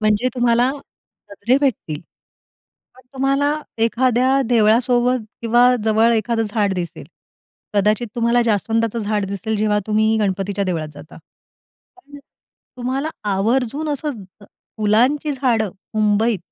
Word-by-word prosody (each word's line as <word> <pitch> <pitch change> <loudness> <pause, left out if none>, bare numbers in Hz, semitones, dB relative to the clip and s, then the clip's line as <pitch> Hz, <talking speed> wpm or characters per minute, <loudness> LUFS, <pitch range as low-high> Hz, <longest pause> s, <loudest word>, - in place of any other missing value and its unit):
म्हणजे 215 +3 +2
तुम्हाला 245 0 +2 0.6
गजरे 215 +5 +1
भेटतील. 195 - -1 0.9
पण 255 - -19
तुम्हाला 275 +2 +1 0.3
एखाद्या 255 +3 +2
देवळासोबत 240 +2 +3 0.2
किंवा 240 +2 +4 0.2
जवळ 225 +1 +3
एखाद 225 +1 0
झाड 210 -2 0
दिसेल. 170 -2 -5 0.7
कदाचित 210 +3 +2
तुम्हाला 235 0 +2
जास्वंदाचं 225 +1 0
झाड 210 -1 -1
दिसेल 200 +3 -3
जेव्हा 210 0 +1
तुम्ही 220 +1 +2
गणपतीच्या 200 0 -1
देवळात 165 -5 -2
जाता. 145 +2 -13 0.8
पण 285 -6 -14 0.6
तुम्हाला 265 +5 -2 0.2
आवर्जून 245 +9 0
असं 295 +1 -2
ज 190 +2 -19 0.3
फुलांची 245 +8 +2
झाडं 240 -6 0 0.2
मुंबईत 215 +1 +2
225 Hz, 115 wpm, -20 LUFS, 210-250 Hz, 0.9 s, किंवा